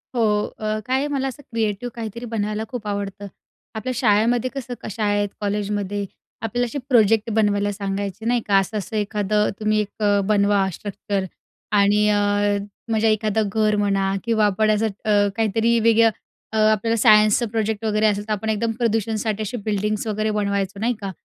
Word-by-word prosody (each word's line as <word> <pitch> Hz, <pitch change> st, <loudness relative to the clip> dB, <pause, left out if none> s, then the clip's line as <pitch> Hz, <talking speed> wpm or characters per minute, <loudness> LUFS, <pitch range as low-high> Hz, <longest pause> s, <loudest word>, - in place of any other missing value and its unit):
हो. 240 Hz, -, +1 dB, 0.4 s
अ, 215 Hz, 0 st, -1 dB
काय 265 Hz, +3 st, 0 dB
मला 275 Hz, -2 st, -1 dB
असं 270 Hz, +2 st, -7 dB
क्रिएटिव्ह 225 Hz, +1 st, -2 dB
काहीतरी 235 Hz, +1 st, -6 dB
बनवायला 215 Hz, -1 st, -2 dB
खूप 240 Hz, -4 st, -6 dB
आवडतं. 200 Hz, 0 st, -4 dB, 0.5 s
आपल्या 225 Hz, +4 st, -3 dB
शाळेमध्ये 235 Hz, +2 st, +2 dB
कसं 250 Hz, -2 st, -5 dB
क -, -, -5 dB
शाळेत, 205 Hz, -1 st, 0 dB
कॉलेजमध्ये 205 Hz, -1 st, -2 dB, 0.4 s
आपल्याला 240 Hz, +2 st, -1 dB
असे 245 Hz, +4 st, -5 dB
प्रोजेक्ट 225 Hz, -2 st, +4 dB
बनवायला 205 Hz, -1 st, +2 dB
सांगायचे, 200 Hz, +1 st, -4 dB
नाही 240 Hz, 0 st, +2 dB
का. 200 Hz, -, +4 dB
असं-असं 210 Hz, +2 st, -4 dB
एखादं 210 Hz, 0 st, 0 dB
तुम्ही 215 Hz, 0 st, +1 dB
एक 210 Hz, +1 st, -6 dB
अ, 205 Hz, -1 st, +3 dB
बनवा 200 Hz, -2 st, +3 dB
स्ट्रक्चर 200 Hz, +1 st, -4 dB, 0.5 s
आणि 205 Hz, +1 st, +4 dB
अ, 210 Hz, -, +3 dB, 0.7 s
म्हणजे 220 Hz, 0 st, +2 dB
एखादं 215 Hz, 0 st, 0 dB
घर 215 Hz, -1 st, +2 dB
म्हणा 195 Hz, -1 st, +1 dB
किंवा 225 Hz, -2 st, +2 dB
आपण 215 Hz, +2 st, +2 dB
असं 215 Hz, +1 st, +1 dB, 0.2 s
अ, 205 Hz, -1 st, +3 dB
काहीतरी 225 Hz, +1 st, +2 dB
वेगळं 230 Hz, 0 st, +5 dB, 0.4 s
अ, -, -, 0 dB
आपल्याला 225 Hz, +2 st, +1 dB
सायन्सचा 215 Hz, +1 st, +5 dB
प्रोजेक्ट 220 Hz, -1 st, -1 dB
वगैरे 215 Hz, 0 st, +1 dB
असेल, 205 Hz, -1 st, +1 dB
तर 215 Hz, -, 0 dB
आपण 215 Hz, +1 st, -3 dB
एकदम 220 Hz, +1 st, 0 dB
प्रदूषणसाठी 220 Hz, -2 st, 0 dB
अशी 215 Hz, +3 st, -3 dB
बिल्डिंग्स 210 Hz, 0 st, -1 dB
वगैरे 215 Hz, 0 st, -1 dB
बनवायचो, 200 Hz, -1 st, -1 dB
नाही 235 Hz, +3 st, +1 dB
का? 195 Hz, -1 st, -4 dB
215 Hz, 165 wpm, -22 LUFS, 205-225 Hz, 0.7 s, वेगळं